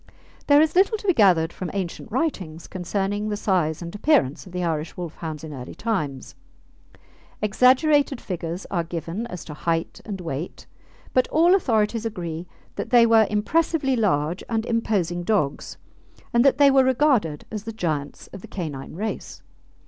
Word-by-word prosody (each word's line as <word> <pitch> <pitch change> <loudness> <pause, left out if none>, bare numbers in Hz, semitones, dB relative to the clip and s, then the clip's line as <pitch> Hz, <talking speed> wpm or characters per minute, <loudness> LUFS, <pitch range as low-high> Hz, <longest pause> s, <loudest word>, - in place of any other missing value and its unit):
There 285 0 +7
is 315 - -1
little 395 +4 +4
to 415 - -12
be 370 - +4
gathered 175 - +4
from 185 - -5
ancient 190 +2 -4
writings 190 - -2
concerning 200 +3 -2
the 210 - -2
size 175 -6 0
and 170 - -7
appearance 205 - +1
of - - -12
the 180 0 -3
Irish 160 -2 -2
Wolfhounds 160 -3 -6
in 155 -2 -7
early 125 -2 -8
times. 155 - -3 1.1
Exaggerated 265 +5 +3
figures 170 0 -5
are 175 -3 0
given 170 +6 -5
as 180 -7 -8
to 150 - -8
height 165 +2 -2
and 200 -3 -6
weight; 165 -1 -5 0.5
but 255 - +3
all 335 +4 +4
authorities 230 - +1
agree 175 -6 -5 0.3
that - - -4
they 240 -2 +6
were 225 -2 +5
impressively 270 +6 +1
large 175 -7 0
and 225 -1 -1
imposing 200 -7 0
dogs, 175 -7 -1 0.6
and 235 0 +5
that 275 -1 +4
they 285 -1 +6
were 270 -1 +5
regarded 255 - +2
as 215 -1 -5
the 225 - -4
giants 155 -9 -3
of 195 - -8
the - - -10
canine 155 -7 -6
race. 215 +5 -5
200 Hz, 165 wpm, -24 LUFS, 165-235 Hz, 1.1 s, There